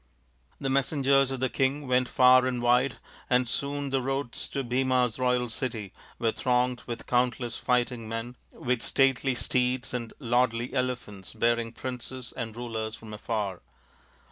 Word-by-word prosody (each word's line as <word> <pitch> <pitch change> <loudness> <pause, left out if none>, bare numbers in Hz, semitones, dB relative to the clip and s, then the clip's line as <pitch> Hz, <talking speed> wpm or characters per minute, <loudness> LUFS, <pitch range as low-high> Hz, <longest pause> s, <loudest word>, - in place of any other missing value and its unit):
The 135 - -2
messengers 135 0 +3
of 135 -1 -4
the 130 - +3
king 135 +2 0
went 125 0 +2
far 130 0 +6
and 125 -1 -1
wide, 125 +2 +3 0.3
and 125 0 +3
soon 140 +2 -2
the 135 -1 +1
roads 135 -1 -3
to 140 - -2
Bhima's 125 -1 +1
royal 125 -1 +2
city 115 -4 -4 0.2
were 115 -1 +1
thronged 125 0 +1
with 120 -2 -5
countless 120 -1 0
fighting 120 -2 0
men, 115 +2 -4 0.2
with 125 -2 -1
stately 135 -1 +2
steeds 125 +1 0
and 120 -2 -3
lordly 120 -2 +1
elephants 125 -7 -3
bearing 115 0 +1
princes 130 0 -6
and 115 -3 -5
rulers 110 -2 -4
from 110 -1 -11
afar. 105 -4 -3
125 Hz, 145 wpm, -28 LUFS, 115-130 Hz, 0.3 s, far